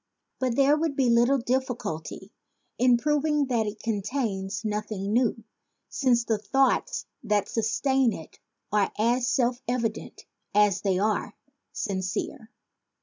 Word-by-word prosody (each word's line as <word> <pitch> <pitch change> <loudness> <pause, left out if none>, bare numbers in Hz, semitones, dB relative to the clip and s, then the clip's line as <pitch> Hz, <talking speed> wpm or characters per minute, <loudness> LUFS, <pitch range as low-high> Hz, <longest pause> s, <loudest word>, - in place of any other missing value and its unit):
But 255 -2 0
there 280 +2 +5
would 310 -2 -1
be 260 -3 +3
little 240 +4 +4
difficulty 235 - -3 0.5
in 250 0 +5
proving 295 +2 +1
that 230 -3 +1
it 210 +1 -7
contains 210 -2 -2
noth 210 0 -2
ing 200 0 -3
new, 235 -2 +1 0.5
since 245 -4 +2
the 220 -2 0
thoughts 265 +6 +1 0.2
that 210 -1 +1
sustain 240 +3 +1
it 160 -6 -9 0.3
are 205 -1 +2
as 240 +3 +2
self 245 -1 +1
evident 230 -3 -3 0.3
as 210 -3 +4
they 195 -3 +1
are 210 +1 -1 0.4
sincere. 195 +5 -3
230 Hz, 130 wpm, -26 LUFS, 210-260 Hz, 0.5 s, there